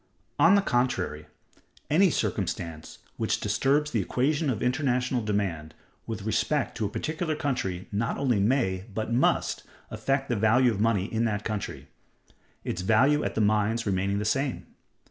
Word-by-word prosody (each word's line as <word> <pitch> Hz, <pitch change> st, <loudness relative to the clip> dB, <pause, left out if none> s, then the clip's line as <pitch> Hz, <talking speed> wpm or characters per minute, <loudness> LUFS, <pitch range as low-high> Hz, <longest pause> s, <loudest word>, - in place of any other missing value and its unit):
On 175 Hz, +4 st, +7 dB
the 200 Hz, -, +3 dB
contrary, 95 Hz, -, -1 dB, 0.6 s
any 185 Hz, +5 st, +4 dB
circumstance 80 Hz, -, -3 dB, 0.2 s
which -, -, 0 dB
disturbs 135 Hz, +8 st, +1 dB
the 110 Hz, -, +1 dB
equation 145 Hz, -, 0 dB
of 120 Hz, -4 st, -2 dB
international 125 Hz, -1 st, 0 dB
demand 95 Hz, -7 st, -2 dB, 0.3 s
with -, -, -5 dB
respect -, -, 0 dB
to 110 Hz, -3 st, 0 dB
a -, -, -6 dB
particular 155 Hz, +6 st, -2 dB
country 125 Hz, -12 st, -2 dB
not 110 Hz, +4 st, -1 dB
only 125 Hz, -6 st, +1 dB
may, 100 Hz, -4 st, +1 dB
but 110 Hz, +3 st, -3 dB
must, 125 Hz, -, +1 dB, 0.3 s
affect 135 Hz, 0 st, -1 dB
the 120 Hz, -, 0 dB
value 115 Hz, +4 st, +4 dB
of 105 Hz, -2 st, -3 dB
money 110 Hz, -4 st, +2 dB
in 115 Hz, +2 st, -1 dB
that 105 Hz, -2 st, -2 dB
country—its 105 Hz, -3 st, -7 dB
value 130 Hz, +10 st, +3 dB
at -, -, -3 dB
the 110 Hz, -, +1 dB
mines 110 Hz, +2 st, +1 dB
remaining 100 Hz, 0 st, 0 dB
the 105 Hz, -, -2 dB
same. 135 Hz, +4 st, -1 dB
115 Hz, 150 wpm, -27 LUFS, 100-135 Hz, 0.6 s, On